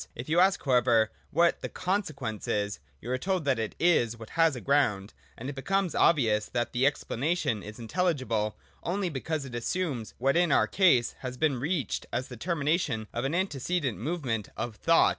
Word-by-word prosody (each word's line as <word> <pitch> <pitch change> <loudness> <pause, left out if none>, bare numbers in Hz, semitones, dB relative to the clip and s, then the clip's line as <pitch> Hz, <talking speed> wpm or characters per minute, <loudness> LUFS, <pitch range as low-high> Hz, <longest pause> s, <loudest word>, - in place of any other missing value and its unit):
If 125 - -7
you 165 +3 +3
ask 190 -2 +3
however 120 -4 +3 0.2
what 170 +2 +2
the - - -4
consequence 155 - -3
is, 105 -1 -1 0.2
you 120 - -5
are 130 - 0
told 185 0 -1
that 135 -4 +2
it 110 -2 -3
is 120 -10 +3
what 110 -2 -11
has 165 -3 +3
a - - -5
ground; 115 -8 +1 0.2
and 125 - -6
it 145 - -3
becomes 190 +6 0
obvious 110 -9 +3
that 120 -1 -2
the 125 +2 +2
expla 140 -4 -1
nation 145 - 0
is 105 +1 -9
inteUigible 120 - -1 0.3
only 185 +1 -1
because 150 0 -3
it 130 - -9
assumes 125 -1 -2
what 135 +4 +2
in 175 0 +3
our - - +5
case 165 -12 +3
has 125 -1 -6
been 140 -3 +1
reached 145 - -2
as 125 +2 -2
the 125 - -7
termination 150 - -1
of 120 +2 -2
an 140 +5 0
antecedent 170 - -1
movement 125 - -2
of 120 -3 -3
thought. 165 +9 +4
135 Hz, 190 wpm, -28 LUFS, 115-170 Hz, 0.3 s, our